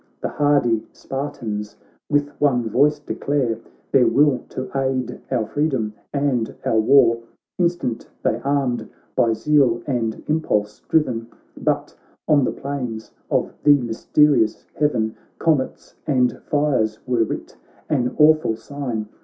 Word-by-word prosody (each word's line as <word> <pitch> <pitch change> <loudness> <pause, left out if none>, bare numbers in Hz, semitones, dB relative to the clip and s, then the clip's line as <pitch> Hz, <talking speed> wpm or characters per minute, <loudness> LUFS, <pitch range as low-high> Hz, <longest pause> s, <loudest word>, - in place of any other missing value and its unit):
The - - -2
hardy 140 -7 +2
Spartans 110 -7 -5 0.3
with 145 0 +2
one 125 -5 +2
voice 145 +7 +3
de 145 - -5
clare 130 -6 -1 0.3
Their 130 -3 +5
will 145 -2 +4
to 130 0 -5
aid 130 -2 -1
our 110 - 0
freedom 130 -6 -1 0.2
and 140 -5 0
our 110 - +3
war; 115 0 +5 0.4
Instant 170 -9 -1
they 115 - 0
armed, 135 -3 0 0.3
by 115 -1 +3
zeal 130 -3 +2
and 115 -5 -2
impulse 105 -10 0
driven, 120 -8 +1 0.3
But - - -1 0.3
on 145 -3 +4
the - - 0
plainsofthe 125 -6 -4 0.3
mysterious 120 0 +2
heaven 115 -7 0 0.2
Comets 155 -5 0
and 125 -4 +2
fires 135 -8 +1
were 120 -2 +2
writ - - -5 0.2
— - - -28
an 125 -5 0
awful 155 -6 +5
sign. 115 -2 -5
130 Hz, 125 wpm, -22 LUFS, 115-145 Hz, 0.4 s, Their